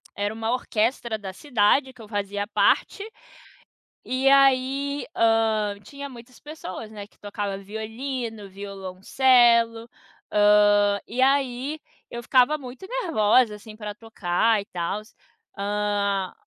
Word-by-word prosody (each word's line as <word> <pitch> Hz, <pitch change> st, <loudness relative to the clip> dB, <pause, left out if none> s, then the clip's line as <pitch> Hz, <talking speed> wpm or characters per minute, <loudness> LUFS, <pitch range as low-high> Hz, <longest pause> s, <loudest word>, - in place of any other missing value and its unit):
era 205 Hz, +1 st, -2 dB
uma 225 Hz, +1 st, -2 dB
orquestra 235 Hz, -1 st, -1 dB
da 195 Hz, -2 st, -7 dB
cidade 260 Hz, +3 st, +1 dB
que 250 Hz, -, -15 dB
eu 215 Hz, -, -11 dB
fazia 205 Hz, -1 st, -3 dB
parte, 395 Hz, -, +1 dB, 1.0 s
e 260 Hz, +1 st, 0 dB
aí, 275 Hz, +1 st, +3 dB
hã, 220 Hz, -2 st, +2 dB
tinha 280 Hz, 0 st, -8 dB
muitas 245 Hz, 0 st, -14 dB
pessoas, 290 Hz, -9 st, -8 dB
né, 210 Hz, -2 st, -8 dB
que -, -, -32 dB
tocava 205 Hz, -1 st, -4 dB
violino, 220 Hz, +1 st, -6 dB
violoncelo, 230 Hz, +5 st, +2 dB, 0.4 s
hã, 205 Hz, -1 st, +4 dB
e 245 Hz, +3 st, -2 dB
aí 270 Hz, +2 st, +1 dB, 0.3 s
eu 235 Hz, 0 st, -7 dB
ficava 255 Hz, +5 st, +4 dB
muito 265 Hz, +6 st, -10 dB
nervosa, 255 Hz, -, +2 dB
assim, 215 Hz, +1 st, -12 dB
pra 210 Hz, -1 st, -6 dB
tocar 215 Hz, 0 st, 0 dB
e 200 Hz, -, -11 dB
tals. 195 Hz, +5 st, -5 dB, 0.4 s
Hã 200 Hz, -1 st, -1 dB
225 Hz, 120 wpm, -24 LUFS, 205-255 Hz, 1.0 s, hã